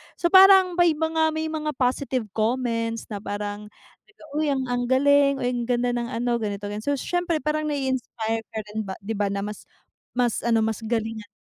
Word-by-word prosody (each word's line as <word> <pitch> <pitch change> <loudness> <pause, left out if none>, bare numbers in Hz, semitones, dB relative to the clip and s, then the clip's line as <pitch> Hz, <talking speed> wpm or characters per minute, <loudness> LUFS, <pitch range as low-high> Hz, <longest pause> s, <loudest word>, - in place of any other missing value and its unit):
so 345 - 0
parang 380 -1 +8
may 345 -3 +5
mga 320 0 +1
may 315 0 -1
mga 305 -2 -3
positive 255 0 0
comments 230 0 -1
na 205 - -4
parang, 205 0 -5 0.4
"teka, 420 -5 -20 0.2
uy 310 - +1
ang 275 -2 0
ang 245 0 -1
galing, 280 +1 +4
uy 245 - +1
ang 240 -1 -3
ganda 245 0 +1
ng 240 -1 -2
ano 240 0 0
ganito 205 -2 -4
ganyan," 210 - -4
so 285 +3 0
siyempre 340 0 -1
parang 305 0 -1
nai-inspire 260 -5 -2 0.2
ka 220 - -1
rin 215 -1 -4
ba, 190 - -4
di 220 - -5
ba 205 -2 0
na 200 0 -2
mas 210 0 -7 0.5
mas 245 -2 +1
ano 225 -1 +3
mas 220 -1 -1
galingan 225 -1 -3
pa. 210 - -66
245 Hz, 200 wpm, -24 LUFS, 220-300 Hz, 0.5 s, parang